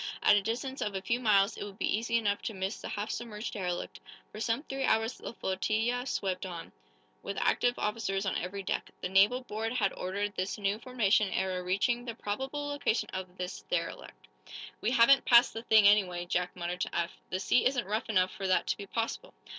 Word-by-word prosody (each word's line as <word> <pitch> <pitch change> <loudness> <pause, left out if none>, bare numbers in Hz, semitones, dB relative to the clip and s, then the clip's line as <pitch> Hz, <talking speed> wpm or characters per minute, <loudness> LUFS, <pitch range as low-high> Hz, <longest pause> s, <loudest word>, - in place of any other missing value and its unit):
At - - +7
a 205 - +3
distance 250 +6 -3
of 205 -2 -2
a 190 - -2
few 235 +1 0
miles 205 -3 +3
it - - -4
would 200 -1 -9
be - - +1
easy 230 +2 0
enough 205 -3 0
to 220 - -4
miss 190 +3 -3
the - - -6
half 205 +1 -3
submerged 225 -2 -5
derelict. 180 -5 -4 0.3
For 215 - -8
some 230 +5 0
three 270 -3 -4
hours 225 -1 +2
the - - -7
flotilla 225 +7 -1
swept 190 -6 -2
on, 175 -3 -7 0.5
with - - -5
active 245 0 +2
officers 210 -2 -1
on 190 - 0
every 195 +3 -4
deck. - - -2
The - - -2
naval 200 +7 +4
board 225 -1 -3
had 210 -6 +1
ordered 200 +3 -3
this 185 0 -2
new 205 +1 -1
formation 220 -5 +2
ere 185 -1 -1
reaching 200 +7 +1
the 235 -2 -5
probable 265 +8 -3
location 285 -5 -1
of 185 -1 -6
the 180 0 -5
derelict. - - -4 0.5
"We 215 - +1
haven't 255 +2 +6
passed 240 0 +6
the 225 - -5
thing, 220 -3 +6
anyway," 185 -4 +3
Jack 180 0 -1
muttered 175 0 -4
to - - -2
Eph. 170 +1 -1
"The 185 - -2
sea 230 +5 +3
isn't 255 -2 -1
rough 215 +4 -2
enough 185 -3 +3
for 195 - -4
that 185 - +2
to - - -1
be 200 - -8
possible." 230 - -3
210 Hz, 210 wpm, -30 LUFS, 190-235 Hz, 0.5 s, At